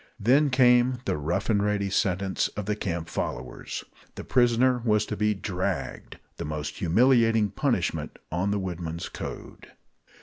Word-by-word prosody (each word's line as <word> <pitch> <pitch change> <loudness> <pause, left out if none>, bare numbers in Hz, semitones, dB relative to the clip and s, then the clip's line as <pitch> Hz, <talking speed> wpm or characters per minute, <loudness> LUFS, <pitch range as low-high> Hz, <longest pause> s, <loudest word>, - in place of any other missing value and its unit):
Then 135 +7 +4
came 125 -1 +4
the - - 0
rough 85 +7 -2
and 105 -3 +2
ready 100 -1 0
sentence 95 -1 +1
of 105 - -3
the 105 +1 -1
camp 85 -5 -3
followers. - - -5 0.3
The - - -7
prisoner 125 +1 +3
was 105 -2 +2
to 105 - -4
be 105 0 +1
"dragged" 95 -1 -4 0.2
the - - -4
most 75 0 -4
humiliating 115 +2 +3
punishment - - -1
on 90 +4 0
the 105 - 0
woodmen's 85 -3 -4
code. - - -8
105 Hz, 145 wpm, -26 LUFS, 90-120 Hz, 0.3 s, Then